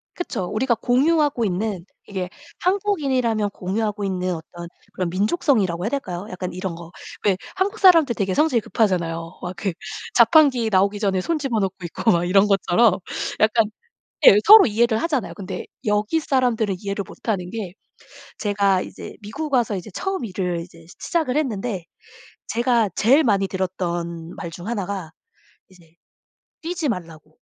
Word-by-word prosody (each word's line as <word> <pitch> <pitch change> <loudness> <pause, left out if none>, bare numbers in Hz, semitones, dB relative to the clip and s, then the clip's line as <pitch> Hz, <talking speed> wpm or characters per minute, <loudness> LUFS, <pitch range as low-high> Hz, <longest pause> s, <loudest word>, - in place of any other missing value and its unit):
그쵸. 235 - -3
우리가 235 +6 0
공유하고 275 +1 +2
있는, 190 -1 -2 0.2
이게 185 -3 -4 0.3
한국인이라면 275 - +1
공유하고 205 +2 -3
있는 185 -1 -1
어떤 170 +1 -9 0.3
그런 180 -2 -2
민족성이라고 200 - +1
해야 220 - 0
될까요? 190 -10 -4
약간 185 -1 -5
이런 185 -1 -4
거. 170 0 -11 0.3
왜 195 -3 +3 0.2
한국 405 +3 -1
사람들 330 - +6
되게 190 -3 -1
성질이 300 -5 +2
급하잖아요. 170 -6 -1
막 180 0 -5
그 195 -1 -2 0.4
자판기 275 -9 +5
나오기 200 +2 +2
전에 195 -3 +1
손 330 - -1
집어 250 -6 -1
넣고 195 -1 -1
있고 195 +6 +1
막 175 0 +2
이런 195 +3 +4
것처럼 195 +1 +3 0.4
약간 220 +1 +4 0.6
예 - - +10
서로 430 0 +10
이해를 230 0 +2
하잖아요. 290 -9 -1
근데 195 -3 -6 0.2
여기 210 +8 +1
사람들은 245 -8 +1
이해를 200 0 -3
못 - - -12
하는 180 -4 -1
게 210 -6 -5 0.7
제가 200 -2 +2
이제 - - -9
미국 280 +8 -5
와서 235 -5 +2
이제 185 +2 -7
처음 385 -9 -2
일을 180 -4 -2
이제 170 0 -11
시 - - -14
시작을 310 -6 -1
했는데 220 - -2 0.6
제가 235 -2 +1
제일 275 +8 +4
많이 195 -4 +2
들었던 175 -3 -4
말 170 - -5
중 175 +4 -9
1 210 -6 -2
가 190 -6 -5 0.6
이제 170 -3 -21 0.7
뛰지 340 -2 -2
말라고. 165 -5 -8
205 Hz, 335 characters per minute, -22 LUFS, 185-250 Hz, 0.7 s, 예